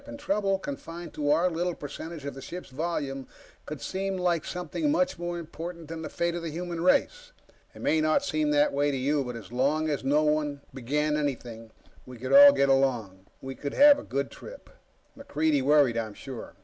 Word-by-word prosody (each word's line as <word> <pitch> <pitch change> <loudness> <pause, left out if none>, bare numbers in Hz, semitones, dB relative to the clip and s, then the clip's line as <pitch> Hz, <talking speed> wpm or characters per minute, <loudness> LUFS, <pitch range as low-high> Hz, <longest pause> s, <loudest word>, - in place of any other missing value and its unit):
Trouble, 200 -8 0
confined 165 0 -7
to 145 -1 -2
our 165 +5 +4
little 175 0 -2
percentage 150 +1 -8
of 140 - -4
the 135 - -10
ship's 175 +2 -8
volume, 140 -3 -3 0.4
could 150 -1 -6
seem 195 0 -3
like 175 -3 0
something 180 - -3
much 275 - 0
more 175 0 -3
important 170 0 -7
than 165 0 -6
the - - -5
fate 170 0 -1
of 175 - -4
the 165 - -4
human 170 +1 -5
race. - - +1 0.4
It - - -10
may 160 - +2
not 155 - +2
seem 305 +1 0
that 295 0 +3
way 145 +1 +1
to 140 - -1
you. 140 +2 +1
But 125 -1 -6
as 115 -1 -10
long 145 +5 +1
as 145 -3 -2
no 145 +3 +2
one 150 -2 0
began 150 +4 -1
anything, 120 -6 -4 0.4
we 125 -1 -10
could 130 +3 -3
all 285 0 +10
get 140 - +2
along. 120 -9 0 0.2
We 135 0 -5
could 140 +2 -6
have 290 0 +7
a - - -9
good 140 0 -3
trip. - - -12 0.4
MacReidie 160 - 0
worried, 140 -3 +4
I'm 110 -2 -3
sure. 130 -4 -9
155 Hz, 200 wpm, -27 LUFS, 135-175 Hz, 0.4 s, all